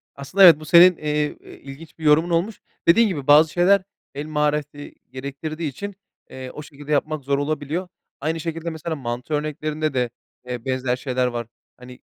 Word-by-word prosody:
Aslında 160 +8 +1
evet, 170 -5 +9
bu 155 - -10
senin, 175 +2 +7
eee, 150 0 -1
eee, - - -14
ilginç 140 +4 -12
bir - - -10
yorumun 155 +3 +4
olmuş. 175 +5 -1 0.3
Dediğin 225 +7 +6
gibi, 150 -9 -4
bazı 155 +2 +6
şeyler 190 +2 +3 0.3
el 145 +2 -4
mahareti 150 -1 -2 0.2
gerektirdiği 140 +4 -5
için, 200 +8 -7 0.3
eee, 130 -1 -8
o - - -8
şekilde 145 0 -10
yapmak 150 0 0
zor 140 +1 0
olabiliyor. 150 +4 -3 0.3
Aynı 160 +3 -2
şekilde 165 +1 -4
mesela, 160 0 -5
mantı 125 +1 -5
örneklerinde 155 0 -2
de, 125 -2 0 0.4
eee, 125 -1 -6
benzer 130 -1 -1
şeyler 125 -1 -1
var. 120 -2 -4 0.3
Hani, 125 0 -13
150 Hz, 175 wpm, -22 LUFS, 135-165 Hz, 0.4 s, evet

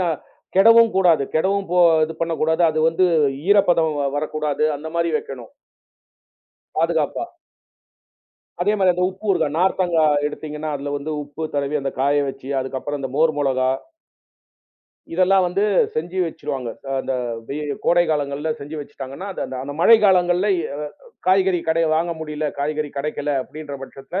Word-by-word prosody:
ந - - +1 0.5
கெடவும் 230 +3 +7
கூடாது, 175 -6 +4
கெடவும் 195 +4 +1
போ 180 - +2 0.3
து - - -5
பண்ணக்கூடாது. 160 0 0
அது 155 - -3
வந்து 165 +3 +2 0.4
ஈரப்பதம் 175 -6 +4 0.2
வரக்கூடாது. 155 0 -1
அந்த 155 +3 -7
மாதிரி 170 0 +1
வெக்கணும். 125 -6 -8 1.3
பாதுகாப்பா. - - 0 1.4
அதே 205 +3 +2
மாதிரி 190 -3 +4
அந்த 180 +1 -2
உப்பு 190 +3 -10
ஊறுகா, 185 - +2
நார்த்தங்கா 175 -2 +2 0.2
எடுத்தீங்கன்னா 150 +1 -5
அதுல 145 0 -4
வந்து 145 +2 -5
உப்பு 145 +2 -9
தடவி 140 +1 0
அந்த 135 0 -2
காய 145 +2 +3
வச்சு 135 0 -8
அதுக்கப்புறம் 135 +2 -4
அந்த 135 - -3
மோர் 160 +1 +4
மொளகா. 130 -2 +1 1.4
இதெல்லாம் 185 +1 +4
வந்து 185 +3 0 0.3
செஞ்சு 175 +4 -3
வச்சிருவாங்க, 135 -6 -4 0.2
த - - -12
அந்த 135 - -3 0.4
வெ 140 - -4 0.3
கோடை 175 0 +4
காலங்கள்ல 145 0 -1
செஞ்சு 145 +3 -7
வச்சுட்டாங்கன்னா, 140 +4 -8
அது - - -7
அந்த 130 - -6
அந்த 140 +2 -6
மழைக்காலங்கள்ல 190 -3 +5 0.2
எ - - -4 0.6
காய்கறி 185 -1 +3
கடையில 160 0 +2
வாங்க 170 +1 0
முடியல. 150 -1 -3
காய்கறி 150 +1 -2
கெடைக்கல 145 +1 -2
அப்படின்ற 150 +1 -9
பட்சத்துல 135 +8 -6
155 Hz, 140 wpm, -21 LUFS, 145-180 Hz, 1.4 s, கெடவும்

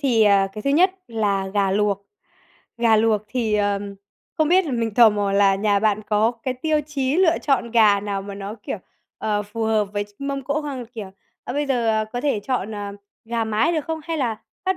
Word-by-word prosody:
thì, 240 -6 +3
ờ, 200 -2 +4
cái 215 - -7
thứ 275 - 0
nhất 355 +6 +5 0.2
là 205 -4 0
gà 200 -2 +2
luộc. 200 0 0 0.7
Gà 230 -2 +4
luộc 215 -1 +2
thì, 230 -4 -1
ờ, 205 -1 +1 0.6
không 310 -1 +3
biết 370 +2 +4
là 290 - -4
mình 230 -3 -1
tò 235 -1 +7
mò 205 -1 -1
là 200 -1 +4
nhà 200 0 +2
bạn 215 0 +1
có 215 +2 +2
cái 255 - -2
tiêu 305 +4 0
chí 275 -1 -1
lựa 355 -3 +4
chọn 270 -5 +1
gà 215 -4 +5
nào 200 -1 -3
mà 200 0 -7
nó, 200 +1 -6
kiểu, - - -4 0.4
ờ, 210 -1 -1
phù 215 +2 -4
hợp 220 -1 +2
với 205 0 -1
ch - - -22
mâm 275 -1 -3
cỗ 285 +3 -1
không? 270 -5 -5
Kiểu, 220 -4 -8 0.3
ờ, - - -4
bây 290 +2 -1
giờ 230 -5 +1
có 245 - -2
thể 275 -7 0
chọn, 220 -2 -2
à, 205 -1 -5 0.3
gà 230 0 -1
mái 220 +10 +1
được 315 -3 -1
không 320 -1 -4
hay 330 +1 -3
là 235 -6 -2 0.2
bắt 380 0 +1
220 Hz, 225 wpm, -22 LUFS, 205-270 Hz, 0.7 s, tò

